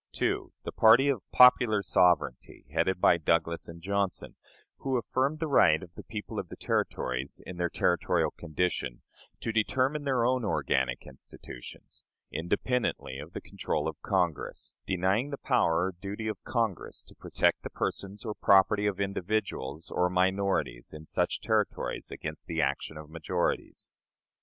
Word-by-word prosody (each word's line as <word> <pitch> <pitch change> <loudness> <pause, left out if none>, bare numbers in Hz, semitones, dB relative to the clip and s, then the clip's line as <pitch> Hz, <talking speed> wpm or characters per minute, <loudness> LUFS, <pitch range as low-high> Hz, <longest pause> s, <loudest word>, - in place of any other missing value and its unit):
2. - - -1
The - - -5
party 120 +6 +6
of 130 -7 0
"popular 120 -4 +6
sovereignty," 85 -6 +1
headed 95 -1 +1
by 85 - +5
Douglas 85 +1 +1
and 85 0 -11
Johnson, 100 -1 -1 0.4
who 135 -2 -1
affirmed 130 +5 0
the 160 +1 -2
right 80 - +4
of 85 -2 -12
the - - -9
people 105 -1 -6
of - - -6
the - - -8
Territories, 65 +2 -2
in 90 - -8
their 85 0 0
territorial 85 +1 +1
condition, 75 -6 -2 0.4
to 115 - -2
determine 130 +6 +1
their 130 -4 +1
own 125 0 +1
organic 65 - 0
institutions, 60 -1 -12 0.3
independently 95 - -1
of 75 +4 -9
the - - -5
control 75 0 -3
of 80 0 -6
Congress; 90 -6 -1
denying 95 +8 +1
the 140 - -4
power 90 -12 +2
or 95 - -1
duty 100 +3 -4
of 105 -3 -4
Congress 115 -7 -2
to - - -14
protect - - 0
the - - -6
persons 100 +2 -4
or 110 - -2
property 100 +1 +4
of 100 -2 -2
individuals 100 -6 -2
or 90 0 +2
minorities 90 -10 0
in 75 +1 -10
such - - -1
Territories - - -1
against - - -7
the - - -3
action 80 - -1
of 75 0 -9
majorities. 85 +2 -2
95 Hz, 150 wpm, -29 LUFS, 80-110 Hz, 0.4 s, party